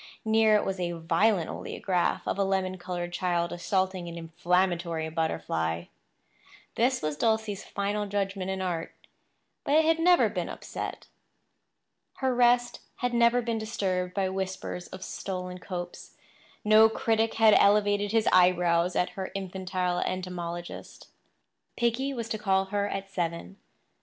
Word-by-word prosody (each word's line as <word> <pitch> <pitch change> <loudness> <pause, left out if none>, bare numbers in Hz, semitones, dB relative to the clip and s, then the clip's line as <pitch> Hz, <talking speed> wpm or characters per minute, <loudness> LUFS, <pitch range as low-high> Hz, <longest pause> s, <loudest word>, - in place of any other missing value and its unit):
Near 220 -1 +4
it 210 - +2
was 190 -1 -2
a 175 -1 -1
violent 170 +2 +2
oleograph 180 -3 -1
of - - -1
a - - +4
lemon 190 -1 -1
coloured 175 -1 -4
child 175 -1 0
assaulting 185 0 -1
an 170 - -8
inflammatory 170 0 0
butterfly. 85 - -1 0.9
This 250 +2 +1
was 155 -1 -1
Dulcie's 220 +2 0
final 205 +1 -2
judgment 195 -1 -2
in 190 0 -2
art; 170 -3 -3 0.7
but 285 - +1
it 315 0 +5
had 325 0 +3
never 355 +1 +5
been - - -3
upset. - - -6 1.1
Her 265 -1 0
rest 240 0 +3 0.2
had 245 -1 -2
never 235 +1 +4
been 230 -1 -1
disturbed 185 -4 -2
by 195 -2 +1
whispers 190 -1 -4
of 185 0 -9
stolen 180 -2 -5
copes; 175 -1 -7 0.5
no 215 +1 +7
critic 225 0 0
had 220 -1 +6
elevated 205 0 +4
his 225 -1 +2
eyebrows 180 -1 +4
at 180 0 +1
her 190 +1 -5
infantile 185 -2 -2
entomologist. 175 -2 -5 0.7
Piggy 240 +4 0
was 235 -4 -4
to 215 - -2
call 195 -2 +2
for 190 - -19
her 205 0 0
at 195 0 -5
seven. 170 +1 -3
190 Hz, 140 wpm, -28 LUFS, 180-220 Hz, 1.1 s, no